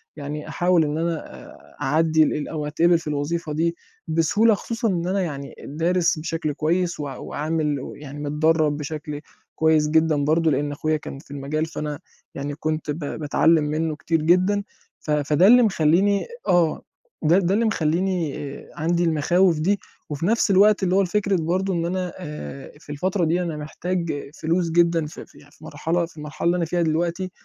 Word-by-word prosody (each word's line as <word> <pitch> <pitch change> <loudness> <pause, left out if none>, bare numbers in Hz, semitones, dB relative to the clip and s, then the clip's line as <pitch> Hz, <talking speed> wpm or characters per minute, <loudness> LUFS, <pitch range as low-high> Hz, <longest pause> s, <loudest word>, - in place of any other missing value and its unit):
يعني 150 +1 -6
أحاول 175 0 +2
إن 150 +1 -2
أنا 165 0 0 0.3
آآ - - -17
أعدِّي 155 +3 +3
ال 150 - -1
أو 150 -2 -4
أتقِبِل 170 +3 +3
في 160 - -11
الوظيفة 150 +2 -2
دي 170 +2 0 0.3
بسهولة 165 +8 +3
خصوصًا 230 +3 -2
إن 175 -3 -1
أنا 195 +1 0
يعني 140 -5 -5
دارِس 165 +2 +1
بشكل 155 -1 -2
كويس 170 +3 0
و - - -2
وعامل 150 +1 -2
و - - -7
يعني 145 0 -9
متدرَّب 150 +1 +1
بشكل 150 0 -5 0.3
كويس 155 -1 +3
جدًا 160 0 +3
برضه 160 +1 +3
لإن 145 +2 0
أخويا 155 +2 -1
كان 140 -2 -8
في 140 - -17
المجال، 145 +3 -2
فأنا 150 -2 -5 0.4
يعني 140 +1 -4
كنت 155 -1 -2
ب 145 - -4
باتعلِّم 155 +2 +2
منّه 155 +1 -1
كتير 165 0 -1
جدًا، 185 +5 +3 0.4
ف 155 - -5
فده 150 +4 +3
اللي 245 +3 +8
مخلّيني 195 +1 +2 0.2
آه، 170 -3 +3 0.4
ده 170 +4 +4
ده 185 0 +1
اللي 225 +3 +2
مخلّيني 170 -4 0 0.2
آآ - - -12
عندي 170 +3 0
المخاوف 170 +1 +3
دي 195 +5 +1 0.3
وفي 150 +2 -3
نَفْس 225 0 +2
الوقت 205 +1 +5
اللي 185 0 +2
هو 195 - +5
الفكرة 200 +1 +1
برضه 185 +3 0
إن 170 -1 -1
أنا 180 0 -2
آآ 150 -5 -8
في 145 - -11
الفترة 180 +5 0
دي 170 +3 +1
أنا 160 -3 -4
محتاج 170 +2 -3 0.3
فلوس 170 +2 +1
جدًا 170 -1 +3
ف 150 - -9
في - - -13
يع - - -18
في - - -21
مرحلة 170 +1 -1
في 165 -1 -18
المرحلة 150 +2 -6
اللي 175 +1 +3
أنا 170 - 0
فيها 175 +2 -1
دلوقتي 170 +3 -1
160 Hz, 180 wpm, -23 LUFS, 150-175 Hz, 0.4 s, اللي